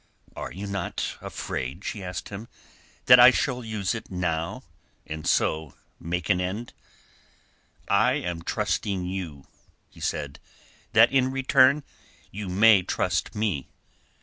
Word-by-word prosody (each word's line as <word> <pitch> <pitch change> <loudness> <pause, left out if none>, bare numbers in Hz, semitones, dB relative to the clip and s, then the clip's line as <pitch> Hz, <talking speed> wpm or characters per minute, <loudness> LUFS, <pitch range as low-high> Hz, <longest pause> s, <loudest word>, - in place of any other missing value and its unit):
"Are - - -6
you 95 +4 -7
not 100 0 -3
afraid," 65 +9 -5
she 100 - -5
asked 90 -2 -6
him, 105 +3 -8 0.6
"that 125 0 +9
I 125 +1 +10
shall 125 -1 -1
use 110 -4 -2
it 115 -1 -7
now, 90 +4 -2 0.4
and 80 0 -6
so 80 -2 +1 0.2
make 85 0 -3
an 90 - +2
end?" 100 +6 -4 1.1
"I 110 +6 +3
am 90 - -3
trusting 95 +2 -1
you," 90 -7 -5 0.5
he - - -17
said, 70 -1 -3 0.5
"that 115 +2 +6
in 130 -1 +3
return 135 +2 +4 0.5
you 100 -1 -6
may 100 +2 +6
trust - - -1
me. 100 -11 -2
100 Hz, 130 wpm, -26 LUFS, 85-115 Hz, 1.1 s, I